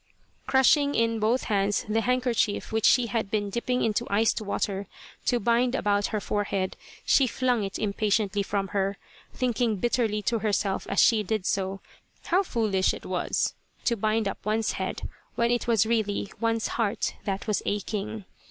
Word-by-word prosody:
Crushing 285 +2 +4
in 230 0 +1
both 225 +4 +1
hands 200 -1 0
the 220 +1 +1
handkerchief 245 -3 0
which 220 -1 +1
she 250 - +5
had 225 -3 -2
been 205 -1 -1
dipping 250 +3 -1
into 215 -2 0
iced 220 +3 +2
water 200 -1 -2 0.4
to 245 - +3
bind 240 +3 +2
about 205 -3 +1
her 215 - -2
forehead, 200 -2 -2 0.3
she 270 - +4
flung 250 -2 0
it 195 -1 -4
impatiently 205 0 0
from 195 -1 -2
her, 195 0 -1 0.3
thinking 240 -3 0
bitterly 215 0 0
to 230 +1 0
herself 200 -2 -1
as 195 - +1
she 225 -2 +5
did 210 -1 -2
so 195 0 -1 0.4
how 365 +3 +3
foolish 215 - +1
it - - -11
was - - -1 0.3
to 235 - +2
bind 215 0 0
up - - -5
one's 215 +1 0
head - - -4 0.3
when 235 -1 +2
it 240 0 0
was 225 -3 +3
really 215 -3 -1
one's 230 -1 0
heart 220 -4 -1
that 195 -1 -2
was 210 -3 0
aching. 210 +1 -3
215 Hz, 165 wpm, -27 LUFS, 200-235 Hz, 0.4 s, she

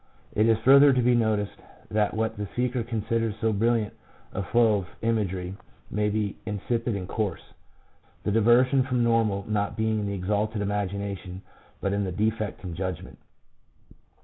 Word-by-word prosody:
It 110 +2 +3
is 115 -1 +4
further 140 +1 +8
to 125 - +2
be 125 +1 +4
noticed 110 -3 +1 0.3
that 105 0 +1
what 110 0 -1
the 105 0 -4
speaker 125 0 0
considers 115 -1 -1
so 110 -1 +1
brilliant 115 0 +1 0.4
a - - -2
flow 110 +2 +3
of 90 - -7 0.2
imagery 95 -5 -1 0.4
may 105 0 +1
be 105 -1 -2
insipid 115 +2 -1
and 95 -2 -4
coarse, 100 -4 -3 0.7
the - - 0
diversion 120 +5 +4
from 125 -2 0
normal 110 -4 +2
not 105 -1 -1
being 110 0 +1
in 105 - -2
the 100 - -2
exalted 105 +3 -1
imagination, 100 -2 -3 0.4
but 100 - 0
in 100 0 0
the 95 - -2
defect 110 +3 -2
in 90 -2 -5
judgment. 95 -1 -5
105 Hz, 160 wpm, -26 LUFS, 100-115 Hz, 0.7 s, further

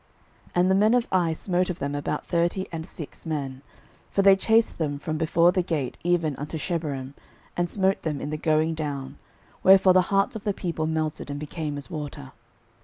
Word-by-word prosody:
06:007:005 - - -23
And 180 +1 +4
the - - +4
men 210 +3 +4
of 245 -1 +1
Ai 175 -3 +2
smote 180 +2 0
of 175 - -3
them 140 -5 -3
about 145 0 -3
thirty 175 +2 0
and 165 0 -5
six 165 -1 -9
men: 135 -4 -3 0.5
for 195 - +1
they 195 0 +8
chased 225 +2 +2
them 145 -3 -1
from 155 +2 -4
before 165 +2 +4
the 185 0 +1
gate 155 -7 -2
even 170 -4 +1
unto 150 +3 -5
Shebarim, 145 -6 -3 0.4
and 175 0 0
smote 195 0 +1
them 150 -3 -2
in 145 - -4
the 155 - -2
going 155 +1 +2
down: 140 -3 -5 0.4
wherefore 190 -1 +7
the 185 - +6
hearts 195 +2 +2
of 215 - -6
the 205 -2 -1
people 165 -3 -2
melted, 155 -2 -2
and 145 0 -4
became 150 0 -4
as 140 - -8
water. 145 - -6
160 Hz, 200 wpm, -25 LUFS, 150-185 Hz, 0.5 s, they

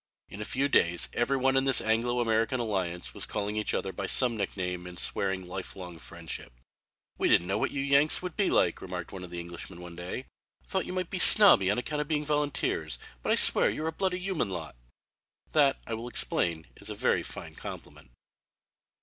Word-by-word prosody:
In 100 - -8
a - - -3
few 135 +5 0
days 85 -10 +2
every 135 +3 +1
one 135 0 +2
in 135 0 +3
this 135 -2 +5
Anglo 120 +2 +1
American 115 +2 +1
alliance 90 - -3
was - - -3
calling 105 0 -3
each 105 0 -1
other 95 - -2
by 95 +2 -4
some 125 +1 +5
nickname 90 -4 -3
and 90 0 -10
swearing 95 +1 -2
lifelong 90 -1 -7
friendship. 85 -7 -8 0.7
"We - - +2
didn't 85 - +4
know 100 +3 -1
what - - 0
you 140 - -3
Yanks 140 +2 +3
would 180 -2 -6
be 200 - +2
like," 85 - +2
remarked 90 -2 -6
one 95 -1 -8
of 90 - -8
the 85 0 -6
Englishmen 85 +1 -8
one 85 -1 -10
day. 90 +9 -6 0.4
"Thought 190 -1 -2
you - - -5
might 185 -2 -3
be 185 - -2
snobby 195 - +8
on 100 - +1
account 150 +4 -2
of 150 - -4
being 150 -1 -1
volunteers, 145 -1 -1 0.2
but - - -1
I - - +5
swear - - +4
you're 155 - -4
a 160 - 0
bloody 185 +2 -1
human 185 - -2
lot." 80 -8 -6 0.8
That, 140 -3 +4
I 115 - -5
will 115 +2 -5
explain, 85 -8 0
is - - -6
a - - -5
very - - +1
fine - - -8
compliment. - - -10
110 Hz, 205 wpm, -29 LUFS, 90-140 Hz, 0.8 s, snobby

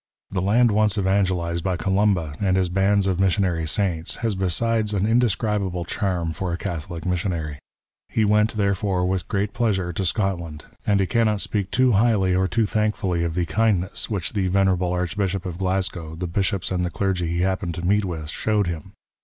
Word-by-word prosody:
The 95 -2 -1
land 115 +5 +4
once 105 0 +2
evangelized 95 -4 +1
by 95 -2 0
Columba 95 -5 +1
and 95 -2 +2
his 95 -2 +1
bands 95 +2 +2
of 95 -2 0
missionary 95 -4 +1
saints, 85 -2 -1
has 110 - +1
besides 105 +3 0
an 100 0 +1
indescribable 105 -6 +1
charm 90 -4 -1
for 90 +3 -3
a 85 - -2
Catholic 85 -3 -5
missionary. 85 -5 -2 0.5
He 110 - +1
went, 105 +1 +2
therefore, 100 -2 +1
with 95 0 -1
great 100 0 -1
pleasure 95 -7 0
to 95 - -2
Scotland, 85 -5 -2 0.2
and 100 -1 +3
he 95 - +2
cannot 110 0 +1
speak 100 -1 -2
too 130 +2 +3
highly 105 -3 +3
or 95 +1 +2
too 115 +3 +1
thankfully 105 -5 0
of 85 -1 -2
the 90 -1 +1
kindness 100 +1 0
which 95 -4 -3
the 100 -3 0
Venerable 95 -1 +2
Archbishop 90 +1 -1
of 90 -1 -5
Glasgow, 90 -4 -2
the 90 +2 -4
Bishops 95 +2 -1
and 90 -1 0
the 90 - -1
Clergy 90 -2 -1
he 85 +1 -1
happened 95 -2 -1
to 85 - -5
meet 105 +3 +3
with 80 -5 -4
showed 105 +1 0
him. 85 -3 -5
95 Hz, 185 wpm, -23 LUFS, 90-105 Hz, 0.5 s, land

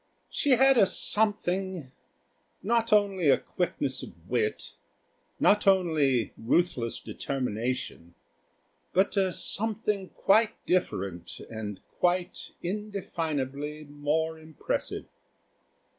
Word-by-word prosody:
She 285 - +3
had 265 0 +5
a 195 - +6
something 190 -9 0 0.7
not 230 +2 +1
only 195 -8 +4
quickness - - -2
of - - -12
wit, 440 -1 -1 0.7
not 210 0 +4
only 155 - +3
ruthless 120 -2 +1
determination, 125 -9 -3 0.8
but 190 +3 +2
a 190 -2 +2
something 210 0 -1
quite 220 +2 +3
different 95 - -1
and 105 -3 -5 0.2
quite 180 +1 0
indefinably 160 -7 -3
more 150 +2 -1
impressive. 155 -1 -4
175 Hz, 85 wpm, -28 LUFS, 140-200 Hz, 0.8 s, a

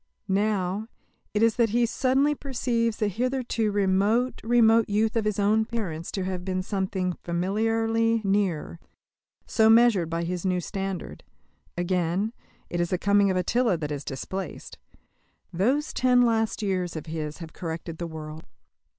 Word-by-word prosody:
Now, 200 0 0 0.4
it 210 +1 +1
is 230 -1 +3
that 235 -2 +3
he 235 +3 +2
suddenly 265 +5 +2
perceives 240 -5 -1
the 215 - +1
hitherto 235 0 -1
remote, 205 +5 +1
remote 230 -1 +4
youth 215 +3 +1
of 225 -2 +1
his 210 -2 0
own 210 +2 +3
parents 190 -8 -4
to 190 - -2
have 185 -1 -3
been 185 0 -2
something 190 -2 -2
familiarly 225 +5 +1
near, 195 -5 0 0.7
so 220 -1 +3
measured 225 -7 +5
by 170 0 -2
his 175 0 -3
new 185 -1 +1
standard; 195 0 -5 0.5
again, 180 +4 0 0.3
it 175 - -2
is 175 - 0
the 185 - 0
coming 200 +1 +3
of 185 - +1
Attila 220 +2 +1
that 150 -2 -4
is 145 -1 -4
displaced. 190 +8 -6 0.7
Those 260 - +1
ten 250 -1 +4
last 225 -2 +1
years 185 -4 -1
of 155 - -5
his 155 -1 -5
have 165 -3 -9
corrected 165 -1 -6
the 170 - -3
world. 155 -1 -8
200 Hz, 150 wpm, -26 LUFS, 180-225 Hz, 0.7 s, measured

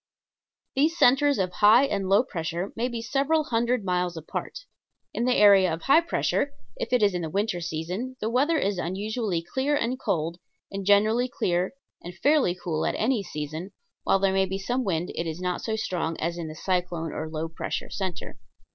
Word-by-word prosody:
These 310 +5 +2
centers 280 +3 +4
of 185 -2 0
high 215 +7 +6
and 200 -7 -2
low 200 +5 +5
pressure 170 -4 -4
may 235 +2 0
be 235 -2 -5
several 285 +6 +1
hundred 240 -3 0
miles 180 -2 -1
apart. - - -6 0.5
In 235 - -1
the 250 0 +3
area 200 -3 +6
of 160 +1 -4
high 280 +5 +5
pressure, 310 -4 0 0.2
if - - -4
it 250 -3 +3
is 200 -2 +4
in 180 - -2
the 160 - -3
winter 195 0 -1
season, 180 +11 -4
the 215 - -2
weather 280 +8 +2
is 200 -8 0
unusually 195 +1 -2
clear 265 - 0
and 255 -1 -1
cold, 170 -3 -2 0.3
and 195 -1 -5
generally 215 +4 +4
clear 180 -1 -1 0.3
and 175 +1 -9
fairly 285 - +3
cool 165 -3 -3
at - - -1
any 230 0 +1
season, 155 -3 -5
and 190 +3 -10 0.3
while - - +3
there 195 0 +1
may 190 0 +2
be 190 +1 -3
some 245 +6 -1
wind 175 -4 -1
it 165 - -3
is 160 +1 -4
not 180 -1 -2
so 220 - -2
strong 175 -6 -2
as 170 +1 -1
in 170 -2 -5
the 155 - -8
cyclone 175 -2 -2
or 155 +1 -4
low 160 +1 -3
pressure 165 - -5
center. 190 - -5
195 Hz, 200 wpm, -26 LUFS, 175-245 Hz, 0.5 s, high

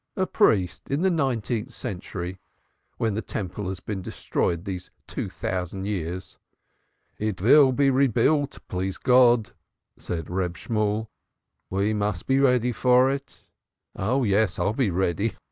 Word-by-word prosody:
"A 190 - +1
priest 105 - +1
in 140 +5 0
the 190 - +3
nineteenth 125 -6 -1
century! 95 -5 -6 0.6
When 110 -2 0
the 110 - -2
Temple 100 -2 -5
has 95 -1 -5
been 100 -3 -5
destroyed 85 -1 -2
these 90 -2 -5 0.2
two - - -4
thousand 95 +1 -3
years." 90 -2 -4 0.8
"It 105 -2 -2
will 130 +7 +6
be 135 +1 +3
rebuilt, 140 +2 +2
please 95 +1 -3
God," 125 -3 +4 0.5
said 80 -3 -4
Reb 90 -1 -2
Shemuel. 110 0 -1 0.6
"We 100 +3 0
must 105 -4 -1
be 135 0 +2
ready 125 -3 +3
for 125 +2 +4
it." 140 -1 -6 0.5
"Oh 125 +8 0
yes, 100 -3 +2
I'll 95 +4 +1
be 120 -3 +1
ready 95 +3 0
Ha! - - -7
105 Hz, 145 wpm, -25 LUFS, 95-130 Hz, 0.8 s, will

